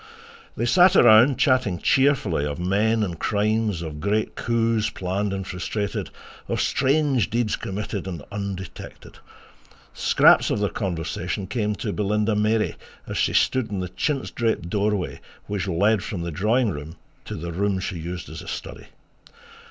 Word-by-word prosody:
They 120 Hz, -, 0 dB
sat 180 Hz, +8 st, +5 dB
around 120 Hz, +2 st, +7 dB
chatting 130 Hz, -, +2 dB
cheerfully 130 Hz, -, +2 dB
of 75 Hz, -1 st, -3 dB
men 105 Hz, +5 st, +1 dB
and 85 Hz, -5 st, -4 dB
crimes, 105 Hz, -3 st, 0 dB
of 75 Hz, -2 st, -6 dB
great 105 Hz, +5 st, 0 dB
coups 115 Hz, -1 st, 0 dB
planned 95 Hz, +2 st, -2 dB
and 95 Hz, -1 st, -3 dB
frustrated, 95 Hz, +3 st, -3 dB, 0.4 s
of -, -, -1 dB
strange 135 Hz, -4 st, +2 dB
deeds 115 Hz, -1 st, 0 dB
committed 100 Hz, 0 st, -5 dB
and 85 Hz, -6 st, -6 dB
undetected. 100 Hz, -2 st, -7 dB, 0.7 s
Scraps -, -, +4 dB
of -, -, 0 dB
their 105 Hz, -1 st, +1 dB
conversation 90 Hz, +1 st, -3 dB
came 105 Hz, +1 st, -1 dB
to 105 Hz, +1 st, -4 dB
Belinda 105 Hz, +1 st, 0 dB
Mary 105 Hz, +1 st, +1 dB, 0.3 s
as -, -, -4 dB
she -, -, +1 dB
stood 130 Hz, -3 st, +2 dB
in 100 Hz, -2 st, -3 dB
the 90 Hz, -1 st, -3 dB
chintz 135 Hz, -, -2 dB
draped 110 Hz, -7 st, -1 dB
doorway 105 Hz, -2 st, -1 dB, 0.3 s
which 100 Hz, -2 st, -3 dB
led 100 Hz, +4 st, +2 dB
from 95 Hz, -8 st, -4 dB
the 85 Hz, -, -4 dB
drawing 110 Hz, -, +1 dB
room 75 Hz, +2 st, -7 dB, 0.3 s
to -, -, -6 dB
the 85 Hz, +2 st, -5 dB
room 95 Hz, +2 st, 0 dB
she 90 Hz, -2 st, -4 dB
used 85 Hz, +2 st, -6 dB
as -, -, -8 dB
a -, -, -12 dB
study. -, -, -7 dB
105 Hz, 155 wpm, -24 LUFS, 90-110 Hz, 0.7 s, around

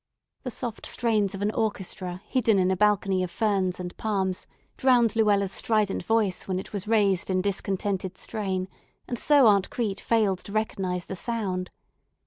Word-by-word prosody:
The 255 Hz, -, -4 dB
soft 235 Hz, -1 st, -5 dB
strains 215 Hz, -5 st, +1 dB
of 195 Hz, -, -4 dB
an 210 Hz, -, +1 dB
orchestra 190 Hz, -4 st, -3 dB
hidden 230 Hz, -5 st, +2 dB
in 185 Hz, 0 st, +2 dB
a -, -, +2 dB
balcony 195 Hz, -1 st, +2 dB
of 180 Hz, -, -2 dB
ferns 190 Hz, -2 st, 0 dB
and 180 Hz, -1 st, -6 dB
palms 190 Hz, -4 st, -1 dB, 0.3 s
drowned 245 Hz, -4 st, +3 dB
Luella's 205 Hz, -3 st, +2 dB
strident 215 Hz, -1 st, +1 dB
voice 210 Hz, -1 st, 0 dB
when 185 Hz, -1 st, -1 dB
it 190 Hz, -, -7 dB
was 205 Hz, 0 st, -4 dB
raised 205 Hz, -4 st, +2 dB
in 185 Hz, -1 st, +1 dB
discontented 195 Hz, -1 st, -2 dB
strain, 190 Hz, -4 st, -2 dB, 0.4 s
and 240 Hz, -, -4 dB
so 290 Hz, -3 st, +5 dB
Aunt 200 Hz, -3 st, +4 dB
Crete 215 Hz, -5 st, -2 dB
failed 210 Hz, -5 st, +1 dB
to 200 Hz, -, -9 dB
recognize 190 Hz, -4 st, -2 dB
the 190 Hz, -, -6 dB
sound. 190 Hz, -4 st, -2 dB
200 Hz, 165 wpm, -26 LUFS, 185-220 Hz, 0.4 s, so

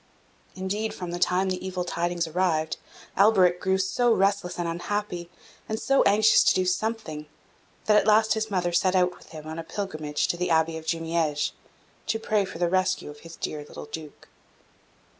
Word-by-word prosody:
Indeed, 200 Hz, +4 st, -3 dB
from 180 Hz, -2 st, -6 dB
the 175 Hz, -, -4 dB
time 185 Hz, +2 st, +2 dB
the 185 Hz, 0 st, -3 dB
evil 185 Hz, -1 st, -3 dB
tidings 175 Hz, 0 st, -1 dB
arrived, 160 Hz, -2 st, 0 dB, 0.4 s
Alberic 190 Hz, -3 st, +4 dB
grew 190 Hz, 0 st, +2 dB
so 195 Hz, +6 st, +1 dB
restless 195 Hz, -3 st, +1 dB
and 175 Hz, -1 st, -2 dB
unhappy, 175 Hz, 0 st, -3 dB, 0.4 s
and 220 Hz, 0 st, -2 dB
so 275 Hz, 0 st, +3 dB
anxious 215 Hz, +2 st, +5 dB
to -, -, +5 dB
do 185 Hz, -, +1 dB
something, 185 Hz, -5 st, -2 dB, 0.6 s
that 210 Hz, +1 st, +5 dB
at -, -, +3 dB
last 220 Hz, 0 st, +5 dB
his 220 Hz, 0 st, -2 dB
mother 180 Hz, -3 st, 0 dB
set 185 Hz, +2 st, +2 dB
out 180 Hz, -1 st, +2 dB
with -, -, -18 dB
him 155 Hz, -1 st, -10 dB
on 160 Hz, +1 st, -6 dB
a -, -, -4 dB
pilgrimage 155 Hz, -6 st, -3 dB
to 175 Hz, -, 0 dB
the 180 Hz, +1 st, -1 dB
Abbey 160 Hz, 0 st, +2 dB
of 160 Hz, 0 st, -8 dB
Jumieges, 165 Hz, -3 st, 0 dB, 0.6 s
to 225 Hz, -, +1 dB
pray 215 Hz, -2 st, 0 dB
for 185 Hz, -, -8 dB
the 175 Hz, 0 st, +1 dB
rescue 185 Hz, -3 st, 0 dB
of 145 Hz, -, -14 dB
his 165 Hz, +1 st, -11 dB
dear 150 Hz, -1 st, -4 dB
little 145 Hz, -, -10 dB
Duke. 150 Hz, 0 st, -9 dB
180 Hz, 185 wpm, -26 LUFS, 165-200 Hz, 0.6 s, anxious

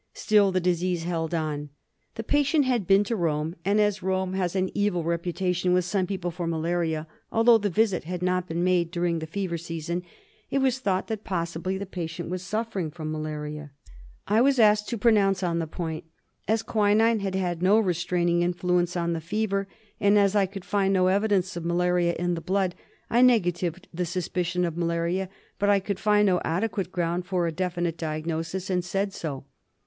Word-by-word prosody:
Still 205 Hz, -2 st, +3 dB
the 185 Hz, -, +1 dB
disease 180 Hz, -1 st, 0 dB
held 165 Hz, -2 st, -2 dB
on. 150 Hz, -2 st, -3 dB, 0.5 s
The 225 Hz, -, -4 dB
patient 290 Hz, +3 st, +2 dB
had 240 Hz, -8 st, 0 dB
been 195 Hz, +1 st, +5 dB
to 230 Hz, +3 st, -2 dB
Rome; 160 Hz, -3 st, -1 dB
and 200 Hz, +3 st, +2 dB
as 210 Hz, -1 st, +2 dB
Rome 190 Hz, 0 st, -1 dB
has 185 Hz, -1 st, -1 dB
ah 185 Hz, -1 st, +2 dB
evil 205 Hz, -4 st, 0 dB
reputation 180 Hz, +2 st, 0 dB
with 180 Hz, -1 st, +2 dB
some 185 Hz, 0 st, 0 dB
people 185 Hz, -2 st, -3 dB
for 170 Hz, 0 st, -4 dB
malaria, 165 Hz, -1 st, -1 dB, 0.3 s
although 230 Hz, 0 st, +5 dB
the 205 Hz, -1 st, 0 dB
visit 195 Hz, -2 st, +1 dB
had 180 Hz, +1 st, -4 dB
not 180 Hz, 0 st, 0 dB
been 170 Hz, +1 st, -2 dB
made 180 Hz, -2 st, +2 dB
during 170 Hz, -1 st, -1 dB
the 160 Hz, -, -6 dB
fever 175 Hz, -1 st, -3 dB
season 165 Hz, +1 st, -4 dB, 0.5 s
it -, -, 0 dB
was 260 Hz, -1 st, +2 dB
thought 190 Hz, -6 st, 0 dB
that 220 Hz, -2 st, -4 dB
possibly 170 Hz, +1 st, -2 dB
the 200 Hz, -, -4 dB
patient 175 Hz, -2 st, -5 dB
was 185 Hz, -1 st, -3 dB
suffering 200 Hz, -3 st, -3 dB
from 155 Hz, 0 st, -6 dB
malaria. 150 Hz, -1 st, -5 dB, 0.6 s
I 215 Hz, +3 st, +3 dB
was 270 Hz, +1 st, +4 dB
asked 210 Hz, -2 st, +4 dB
to 235 Hz, -, -2 dB
pronounce 200 Hz, -4 st, +3 dB
on 170 Hz, -1 st, 0 dB
this 160 Hz, -2 st, -3 dB
point. 160 Hz, -3 st, -4 dB, 0.4 s
As 220 Hz, +1 st, +1 dB
quinine 220 Hz, +1 st, +3 dB
had 195 Hz, -1 st, -3 dB
had 175 Hz, -3 st, -1 dB
no 195 Hz, +4 st, +5 dB
restraining 175 Hz, -2 st, +1 dB
influence 175 Hz, 0 st, 0 dB
on 170 Hz, 0 st, 0 dB
the 165 Hz, -, -3 dB
fever,, 200 Hz, +2 st, -1 dB, 0.3 s
and 205 Hz, +1 st, +4 dB
as 200 Hz, 0 st, +3 dB
I 200 Hz, -2 st, +3 dB
could 195 Hz, -1 st, -9 dB
find 195 Hz, -1 st, +1 dB
no 185 Hz, 0 st, +3 dB
evidence 195 Hz, -2 st, +1 dB
of 170 Hz, -, -4 dB
malaria 175 Hz, 0 st, +1 dB
in 175 Hz, +1 st, 0 dB
the 165 Hz, -, -3 dB
blood,. 190 Hz, 0 st, 0 dB, 0.4 s
I 240 Hz, -, +4 dB
negatived 185 Hz, -7 st, +2 dB
the 180 Hz, +1 st, -1 dB
suspicion 180 Hz, 0 st, -1 dB
of 170 Hz, -2 st, -3 dB
malaria; 170 Hz, +2 st, -1 dB, 0.3 s
but 205 Hz, -, +2 dB
I 200 Hz, -1 st, +5 dB
could 195 Hz, 0 st, -4 dB
find 210 Hz, 0 st, +3 dB
no 180 Hz, -3 st, +2 dB
adequate 185 Hz, +1 st, -1 dB
ground 175 Hz, 0 st, -1 dB
for 180 Hz, -2 st, 0 dB
a 165 Hz, -, 0 dB
definite 175 Hz, -1 st, -2 dB
diagnosis, 165 Hz, +4 st, -3 dB
and 180 Hz, -1 st, +1 dB
said 195 Hz, +2 st, -2 dB
so. 140 Hz, -7 st, -5 dB
180 Hz, 190 wpm, -26 LUFS, 170-200 Hz, 0.6 s, been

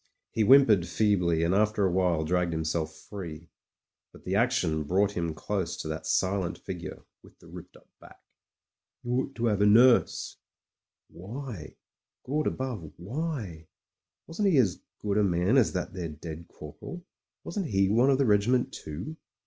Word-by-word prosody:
He 115 Hz, -, -1 dB
whimpered 110 Hz, -7 st, +6 dB
feebly, 90 Hz, -3 st, +2 dB
and 85 Hz, +2 st, +2 dB
after 105 Hz, 0 st, +2 dB
a 95 Hz, -, +2 dB
while 90 Hz, -3 st, +1 dB
dragged 90 Hz, 0 st, 0 dB
himself 80 Hz, 0 st, -2 dB
free. 85 Hz, -3 st, -9 dB, 0.6 s
But -, -, -17 dB
the 90 Hz, -, -2 dB
action 95 Hz, -9 st, +1 dB
brought 95 Hz, +6 st, +2 dB
him 85 Hz, -4 st, -3 dB
close 95 Hz, 0 st, -3 dB
to -, -, -5 dB
that 80 Hz, 0 st, -5 dB
silent 95 Hz, +2 st, 0 dB
figure, 90 Hz, -3 st, -7 dB, 0.2 s
with -, -, -19 dB
the -, -, -20 dB
ripped -, -, -11 dB
up -, -, -23 dB
back.... -, -, -16 dB, 0.8 s
"You 120 Hz, -, -4 dB
ought 130 Hz, +2 st, -1 dB
to 120 Hz, 0 st, 0 dB
'ave 100 Hz, 0 st, +1 dB
a -, -, +5 dB
nurse.. 120 Hz, +4 st, +4 dB, 0.4 s
." -, -, -65 dB
Why? 105 Hz, -, -8 dB, 0.5 s
Gawd 150 Hz, +3 st, 0 dB
above 120 Hz, -, -4 dB
— -, -, -29 dB
^why? 105 Hz, -, -5 dB, 0.6 s
Wasn't 190 Hz, +5 st, -1 dB
he 165 Hz, -, +3 dB
as 105 Hz, -9 st, +2 dB, 0.2 s
good 105 Hz, 0 st, -1 dB
a -, -, +4 dB
man 90 Hz, +4 st, +2 dB
as 130 Hz, -5 st, +4 dB
that 90 Hz, 0 st, -3 dB
there 90 Hz, -4 st, -4 dB
dead 80 Hz, +2 st, -8 dB
corporal? 170 Hz, -, -10 dB, 0.4 s
Wasn't 200 Hz, -6 st, -3 dB
he 95 Hz, -2 st, +2 dB
one 120 Hz, +7 st, +3 dB
of 135 Hz, -, +4 dB
the 140 Hz, -, +2 dB
regiment 115 Hz, +4 st, +2 dB
too? 90 Hz, -, -7 dB
100 Hz, 170 wpm, -28 LUFS, 85-120 Hz, 0.8 s, whimpered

